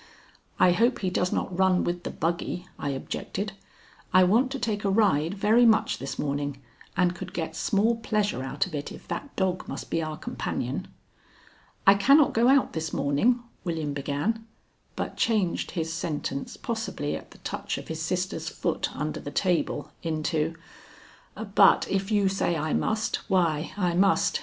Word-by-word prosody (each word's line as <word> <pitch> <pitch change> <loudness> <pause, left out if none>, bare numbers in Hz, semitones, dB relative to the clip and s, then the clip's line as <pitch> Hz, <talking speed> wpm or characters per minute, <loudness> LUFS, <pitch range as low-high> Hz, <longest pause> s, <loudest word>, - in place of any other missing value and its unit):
"I 180 - +6
hope 235 +7 +3
he 185 -2 0
does 180 0 0
not 185 - -2
run 190 0 +3
with 175 0 -2
the - - -1
buggy," 175 +2 -2
I 140 - -2
objected. 190 +8 -4 0.6
"I 185 0 +7
want 225 +8 +4
to 275 - -2
take 215 -5 -2
a 200 - +1
ride 195 -5 +2
very 215 +4 +4
much 225 -2 +4
this 135 - -5
morning 145 -1 -2 0.4
and 180 -2 +3
could 175 - -8
get 160 -1 -3
small 220 +6 +2
pleasure 210 - 0
out 135 +2 -1
of 180 - -10
it 145 -1 -4
if - - -11
that 285 - -5
dog 185 -1 -1
must - - -6
be 165 - +1
our 155 -1 -4
companion." - - -3 1.0
"I 195 - +9
cannot 275 +9 +5
go 230 +2 +4
out 270 0 +4
this 160 -1 -3
morning," 145 - +2 0.2
William 160 -5 -2
began, 145 +11 -1 0.5
but - - -4
changed 210 -7 +1
his 165 0 -1
sentence, 150 -4 -3
possibly 225 -10 -3
at - - -8
the - - -16
touch - - -4
of - - -8
his 160 0 -4
sister's 180 +4 -2
foot - - -1
under - - -3
the - - -6
table, 175 -5 0
into: 160 0 -1 1.0
"But 200 -1 +6
if 195 0 -1
you 205 -2 +3
say 190 -3 0
I 155 0 -1
must, 215 0 0
why, 170 -5 +1
I 180 -4 +1
must. 195 +3 +3
180 Hz, 170 wpm, -27 LUFS, 160-210 Hz, 1.0 s, I